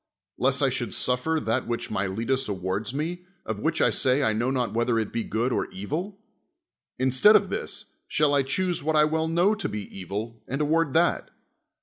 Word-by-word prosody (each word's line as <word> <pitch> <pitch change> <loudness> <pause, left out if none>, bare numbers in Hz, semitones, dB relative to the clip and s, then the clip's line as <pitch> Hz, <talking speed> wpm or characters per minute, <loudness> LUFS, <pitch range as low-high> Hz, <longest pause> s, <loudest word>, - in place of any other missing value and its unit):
lest - - +2
I - - +4
should - - -3
suffer 125 +6 +1
that 110 -6 -1
which 120 -1 -3
Miletus 110 +7 -1
awards 95 +2 -2
me, 165 +6 -3 0.2
of 110 -2 -4
which 160 +8 0
I - - +4
say 130 +2 +2
I 110 - +2
know 120 +4 0
not 125 -5 -1
whether 115 0 +1
it 110 -2 -2
be 115 - 0
good 120 +5 -1
or - - 0
evil? 165 - -4 0.8
instead 130 +12 +5
of 200 -2 +3
this, - - -4
shall 150 -1 +2
I 140 - +4
choose 175 +7 -1
what 155 +2 0
I 150 - +6
well 160 +1 0
know 175 +6 +3
to 210 - -3
be 105 0 -4
evil, 105 +5 -5
and 135 - -3
award 150 -1 +1
that? 170 +2 +2
130 Hz, 195 wpm, -26 LUFS, 110-160 Hz, 0.8 s, I